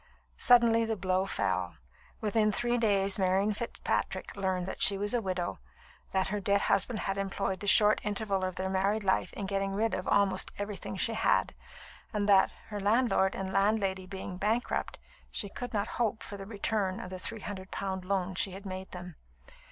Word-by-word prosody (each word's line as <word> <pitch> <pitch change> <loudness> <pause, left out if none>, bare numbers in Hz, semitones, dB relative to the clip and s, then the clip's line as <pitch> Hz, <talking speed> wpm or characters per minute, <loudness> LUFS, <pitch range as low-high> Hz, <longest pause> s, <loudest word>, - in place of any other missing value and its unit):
Suddenly 235 -2 +6
the 225 0 -1
blow 185 0 0
fell. - - -1 0.5
Within 215 0 +2
three 240 +4 +1
days 200 -3 +2
Marian 195 +3 +2
Fitzpatrick 235 +3 -3
learned 190 -2 -1
that 190 - -6
she 200 - +5
was 205 +2 -1
a 240 - +2
widow, 185 -3 -3 0.5
that 190 0 +1
her 210 +1 -1
dead 200 0 +2
husband 210 +1 +1
had 195 0 -2
employed 195 -1 -2
the 205 - -5
short 210 +1 +6
interval 205 -2 -1
of 185 -1 -2
their 190 - -2
married 195 +3 +1
life 190 -1 +1
in 200 - -4
getting 195 0 -1
rid 220 +3 0
of 185 - -3
almost 195 -2 +2
everything 205 -1 -5
she 230 - +2
had; 225 - +2 0.6
and 205 -1 0
that, 195 -2 +6 0.2
her 210 -1 -4
landlord 205 -2 +2
and 190 0 -4
landlady 195 -2 +1
being 190 -1 -6
bankrupt, 220 +5 -1 0.3
she 200 - -3
could 245 +5 -6
not 210 -1 -1
hope 225 -1 0
for 205 - -7
the 195 -1 -8
return 200 -2 -1
of 185 - -7
the 185 - -6
three 225 +3 -4
hundred 190 -2 -6
pound 190 -1 -3
loan 190 -1 -1
she 185 +1 +1
had 195 +2 -9
made 190 0 -6
them. 180 -3 -8
195 Hz, 185 wpm, -30 LUFS, 190-210 Hz, 0.6 s, Suddenly